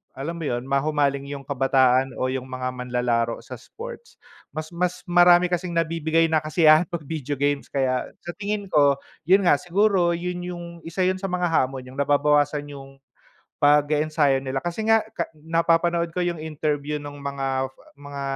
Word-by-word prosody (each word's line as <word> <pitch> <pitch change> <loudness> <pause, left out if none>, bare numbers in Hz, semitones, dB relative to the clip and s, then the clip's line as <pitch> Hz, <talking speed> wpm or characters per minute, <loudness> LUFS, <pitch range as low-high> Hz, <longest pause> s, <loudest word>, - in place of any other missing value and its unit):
alam 155 +6 -4
mo - - -5
yun 120 0 -2
mahumaling 140 0 +1
yung 140 -1 -6
kabataan 135 -1 +3
o 130 - +1
yung 130 0 -3
mga 130 0 -3
manlalaro 125 -2 -1
sa 125 - -9
sports, 470 - -11 0.3
mas 155 0 -5
mas 180 0 -1
marami 175 0 +6
kasing 180 0 -2
nabibigay 165 0 +1
na 155 -1 +1
kasiyahan 155 +1 +5
pag 170 -3 -4
video 145 -3 -4
games, 145 0 -1
kaya 130 -2 -1 0.2
sa - - -2
tingin 205 -1 -3
ko, 145 -4 +3 0.2
yun 190 +6 +5
nga - - +6
siguro 180 +1 +2
yun 175 +1 -3
yung, 175 -1 -6 0.2
isa 165 +3 -8
yun 185 0 +2
sa 190 -1 -5
mga 180 -1 0
hamon, 130 -5 0
yung 130 - -12
nababawasan 145 +1 +2
yung 135 0 -12 0.7
pag-e-ensayo 145 -1 +3
nila, 135 0 -2
kasi 175 +5 -4
nga, 225 0 +5 0.2
ka 170 - 0 0.2
napapanood 165 +1 +1
ko 180 - -2
yung 175 -1 -1
interview 150 -1 -2
nung 145 0 -8
mga 135 -1 -1 0.3
mga 145 -1 -8
150 Hz, 165 wpm, -24 LUFS, 135-175 Hz, 0.7 s, marami